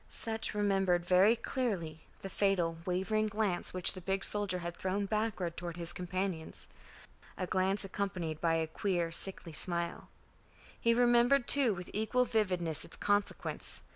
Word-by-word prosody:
Sutch 220 -1 -1
remembered 195 -4 +1
very 190 +5 +5
clearly 190 - -3 0.2
the 195 - -5
fatal 175 -5 0
wavering 195 +4 0
glance 205 -4 -1
which 185 -1 +2
the 185 - -9
big 195 +2 -2
soldier 205 -3 +5
had 170 -1 -5
thrown 190 +3 -2
backward 205 -5 -2
toward 170 -1 -6
his 170 0 -2
companions, 180 -2 -3 0.7
a 185 - -2
glance 190 +2 +1
accompanied 185 -5 -4
by 165 -1 +2
a 160 0 0
queer 170 +1 -2
sickly 170 -1 0
smile. 170 +1 -3 0.7
He 230 0 +2
remembered 240 +2 +4
too, 260 -7 +3
with 180 0 -9
equal 220 +4 +1
vividness, 180 -9 +2
its - - -7
consequence. 205 0 -1
190 Hz, 145 wpm, -32 LUFS, 175-210 Hz, 0.7 s, very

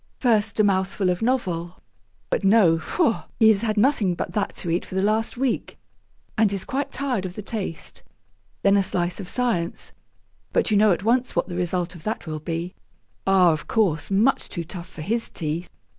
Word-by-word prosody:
First 220 -4 +1
a - - +6
mouthful 190 -1 +1
of 180 - -3
novel; 185 -8 -1 0.5
but - - 0
no, 195 -5 +5
faugh! 230 - 0
he 220 - +7
has 210 -2 +4
had 220 -2 -1
nothing 210 -6 +3
but - - -4
that 210 -2 -2
to 170 - -3
eat 170 - 0
for - - -9
the 190 - +1
last 220 +4 0
week, 260 -2 -1 0.6
and 215 -3 +3
is 195 -1 -3
quite 275 +1 -2
tired 260 -8 -1
of 185 -1 -6
the 210 - -6
taste. 195 -7 -5 0.6
Then 200 0 +5
a - - +4
slice 175 -1 -1
of 195 -2 -6
science; 230 -10 -1 0.6
but - - +2
you - - +4
know 210 0 +5
at 180 - 0
once 245 +3 +1
what - - 0
the 175 - -5
result 180 0 -1
of 170 - -12
that 220 - -3
will 155 -1 -4
be 165 +3 -4 0.5
ah, 185 -3 +5
of 155 -1 -3
course, 175 -9 +1
much 210 +7 +2
too 170 - -4
tough 170 +1 -9
for 155 - -8
his 230 +6 -1
teeth. 165 +2 -4
195 Hz, 200 wpm, -24 LUFS, 175-225 Hz, 0.6 s, he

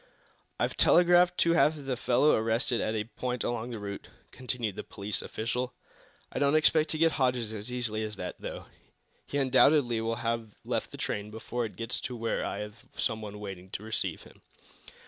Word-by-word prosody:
"I've - - 0
telegraphed 175 0 +5
to 170 - +4
have 155 -3 +3
the 135 -1 -1
fellow 125 +4 +3
arrested 115 +2 +1
at 110 - -1
a 105 - 0
point 125 +2 -3
along 120 0 -2
the 120 - -5
route," 100 -1 -6 0.2
continued 125 -5 -3
the - - -5
police 100 +1 -2
official. 125 +3 -3 0.6
"I - - -3
don't 140 +1 +3
expect 155 0 +4
to 155 - -2
get 165 +1 +4
Hodges 125 -6 0
as 110 +3 -6
easily 120 -3 0
as 105 -1 -4
that, 90 -2 -5
though. - - -6 0.6
He 145 - -2
undoubtedly 130 -2 +4
will 115 0 -1
have 115 -1 -2
left - - -1
the - - -10
train 105 +1 -3
before 115 +2 -3
it 110 - -7
gets 115 0 -3
to 125 - -4
where 115 0 -1
I - - -3
have 105 +1 -8
some 110 - 0
one 105 -1 -7
waiting 95 -3 -7
to 105 - -4
receive 110 0 -2
him." - - -17
115 Hz, 190 wpm, -30 LUFS, 110-130 Hz, 0.6 s, telegraphed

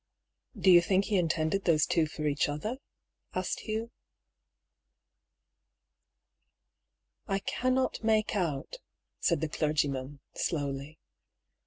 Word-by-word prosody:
" 225 - -19
Do 185 0 +6
you 175 -1 +9
think 190 +3 +2
he 210 - +1
intended 165 +2 0
those 155 -3 +4
two 165 -2 +2
for 155 0 -5
each 145 0 +1
other?" 215 - -3 0.6
asked - - -1
Hugh. 220 +1 -4 0.9
" - - -54 2.3
I 195 -2 +1
cannot 255 +6 0
make 220 -1 +2
out," 160 -8 -2 0.4
said - - +1
the 160 - 0
clergyman, 145 -3 -1
slowly. 145 -1 -3
165 Hz, 115 wpm, -30 LUFS, 150-205 Hz, 2.3 s, you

